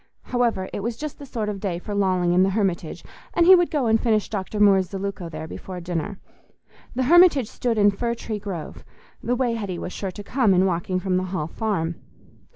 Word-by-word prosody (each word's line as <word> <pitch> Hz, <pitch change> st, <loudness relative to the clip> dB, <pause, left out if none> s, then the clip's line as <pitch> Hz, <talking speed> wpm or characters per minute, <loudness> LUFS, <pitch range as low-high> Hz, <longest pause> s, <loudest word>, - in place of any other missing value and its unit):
However, 235 Hz, -6 st, 0 dB
it -, -, -3 dB
was 230 Hz, +3 st, -3 dB
just 300 Hz, -1 st, -6 dB
the 285 Hz, -, -9 dB
sort 225 Hz, -4 st, -3 dB
of 205 Hz, -2 st, -3 dB
day 190 Hz, -4 st, -2 dB
for 205 Hz, +4 st, -6 dB
lolling 185 Hz, -3 st, +1 dB
in 180 Hz, -, +4 dB
the 190 Hz, -, +4 dB
Hermitage, 190 Hz, -5 st, -2 dB, 0.3 s
and 340 Hz, -, +4 dB
he 375 Hz, -, +9 dB
would 350 Hz, -2 st, +5 dB
go 290 Hz, -5 st, 0 dB
and 225 Hz, -1 st, +3 dB
finish 215 Hz, -3 st, +1 dB
Dr. 205 Hz, 0 st, -4 dB
Moore's 195 Hz, -3 st, +4 dB
Zeluco 195 Hz, -3 st, -4 dB
there 155 Hz, -1 st, -6 dB
before 185 Hz, +2 st, -7 dB
dinner. 175 Hz, +3 st, -4 dB, 0.8 s
The 260 Hz, -, +1 dB
Hermitage 315 Hz, -4 st, +6 dB
stood 235 Hz, 0 st, -2 dB
in 205 Hz, -1 st, +5 dB
Fir 235 Hz, +4 st, -2 dB
tree 220 Hz, -2 st, -5 dB
Grove—the 200 Hz, +5 st, -6 dB
way 245 Hz, -2 st, 0 dB
Hetty 200 Hz, -6 st, -4 dB
was 180 Hz, -, -6 dB
sure 195 Hz, -, -4 dB
to 205 Hz, +3 st, -8 dB
come 225 Hz, -5 st, +2 dB
in 185 Hz, +1 st, +4 dB
walking 185 Hz, 0 st, -1 dB
from 185 Hz, -1 st, 0 dB
the 185 Hz, -, -1 dB
Hall 180 Hz, -4 st, -3 dB
Farm. 170 Hz, -2 st, -2 dB
200 Hz, 210 wpm, -23 LUFS, 185-235 Hz, 0.8 s, he